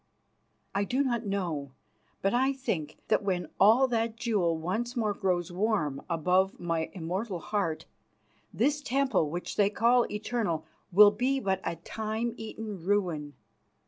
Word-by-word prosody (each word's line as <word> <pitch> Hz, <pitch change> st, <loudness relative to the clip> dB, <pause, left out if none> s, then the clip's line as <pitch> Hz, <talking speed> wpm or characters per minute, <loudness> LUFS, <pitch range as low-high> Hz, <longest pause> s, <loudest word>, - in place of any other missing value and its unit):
"I 200 Hz, -, +1 dB
do 255 Hz, +8 st, +1 dB
not 240 Hz, -4 st, -1 dB
know, 165 Hz, -9 st, -2 dB, 0.5 s
but 195 Hz, -, +2 dB
I 265 Hz, +3 st, +3 dB
think 165 Hz, -, -3 dB
that -, -, +3 dB
when 185 Hz, -3 st, -1 dB
all 230 Hz, +6 st, +6 dB
that 230 Hz, -1 st, 0 dB
jewel 200 Hz, -9 st, +1 dB
once 220 Hz, +10 st, -2 dB
more 215 Hz, -4 st, +1 dB
grows 180 Hz, -3 st, -1 dB
warm 175 Hz, -8 st, 0 dB
above 180 Hz, +4 st, +2 dB
my 165 Hz, -2 st, -1 dB
immoral 185 Hz, +3 st, -3 dB
heart, 195 Hz, -4 st, -2 dB, 0.7 s
this 285 Hz, +6 st, +1 dB
temple 265 Hz, -, +1 dB
which 175 Hz, +3 st, -5 dB
they 200 Hz, -1 st, +4 dB
call 235 Hz, +3 st, +3 dB
eternal 210 Hz, -7 st, -2 dB, 0.3 s
will 205 Hz, +3 st, +8 dB
be 255 Hz, +6 st, 0 dB
but 190 Hz, -5 st, -1 dB
a -, -, -2 dB
time 220 Hz, +7 st, -3 dB
eaten 215 Hz, -4 st, -7 dB
ruin. 175 Hz, -7 st, 0 dB
200 Hz, 145 wpm, -29 LUFS, 175-230 Hz, 0.7 s, will